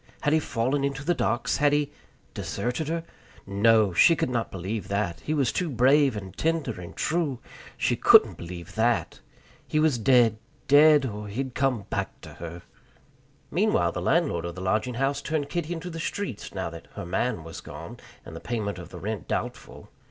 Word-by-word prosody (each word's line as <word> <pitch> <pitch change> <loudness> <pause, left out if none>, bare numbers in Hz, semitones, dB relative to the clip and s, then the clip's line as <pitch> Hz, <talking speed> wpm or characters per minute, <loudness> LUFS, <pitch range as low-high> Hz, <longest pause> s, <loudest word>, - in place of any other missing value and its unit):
Had 145 - +2
he 160 - +5
fallen 135 0 -1
into 140 0 -2
the 175 - +3
docks? 120 -4 0
Had 145 0 +3
he 145 -1 +1 0.4
deserted 125 +6 -3
her? 165 +1 -2 0.4
No! 105 0 +3
She 165 - +6
could 130 - -1
not 120 -2 -1
believe 95 +2 -4
that; 100 -4 -1
he 155 - -2
was 135 -5 +2
too 180 -2 -1
brave 135 +1 +4
and 95 -2 -8
tender 155 - -1
and 85 - -9
true. 155 -5 0 0.4
She - - +1
couldn't - - +6
believe 85 0 -8
that. 115 +2 +1 0.5
He 155 - +1
was 155 -6 +3
dead, 115 -2 +4 0.3
dead, 145 0 +7
or 105 -3 -5
he'd 130 +5 -4
come 130 -6 0
back - - -3
to - - -10
her. 85 +1 -8 0.9
Meanwhile - - +2
the - - -4
landlord 85 0 +1
of 85 0 -5
the - - -7
lodging 110 +6 0
house 135 +3 0
turned 150 -2 -2
Kitty 170 -1 -3
into 175 +1 -4
the 165 - -6
streets, 165 - -4
now 95 -4 -4
that 85 0 -10
"her - - -5
man" 95 +1 -1
was 80 -1 -8
gone, - - -9 0.3
and - - -9
the - - -6
payment 105 -5 -3
of 85 -1 -9
the - - -9
rent 105 -4 -4
doubtful. - - -5
120 Hz, 190 wpm, -26 LUFS, 100-145 Hz, 0.9 s, dead